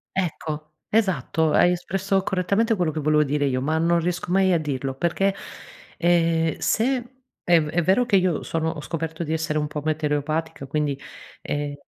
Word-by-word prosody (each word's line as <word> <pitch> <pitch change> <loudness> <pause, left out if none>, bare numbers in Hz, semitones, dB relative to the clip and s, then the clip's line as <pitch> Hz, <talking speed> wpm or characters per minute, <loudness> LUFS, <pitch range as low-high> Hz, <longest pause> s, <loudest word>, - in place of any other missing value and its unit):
Ecco, 155 -4 -3 0.2
esatto, 190 -7 +1
hai 175 - +5
espresso 190 +2 0
correttamente 200 +5 +1
quello 175 -5 0
che 155 - -4
volevo 150 0 +3
dire 145 0 0
io, 130 -2 0
ma 155 +3 0
non 170 +1 +3
riesco 175 +1 -2
mai 190 0 +4
a 165 - +3
dirlo 135 -3 -3
perché, 175 +7 0 0.6
ehm, 165 -2 +2
se 250 +2 0 0.3
è 170 -2 +5
v 150 - -2
è 175 +3 +1
vero 190 +9 +3
che 205 -5 +3
io 180 -4 +1
sono 160 0 -1
ho 160 -2 -5
scoperto 165 +1 -4
di 160 - -2
essere 160 -1 -1
un 150 - 0
po' 150 0 -5
metereopatica 155 -1 -2
quindi, 145 -1 -1 0.5
ehm, 145 0 -3
165 Hz, 175 wpm, -24 LUFS, 150-180 Hz, 0.6 s, hai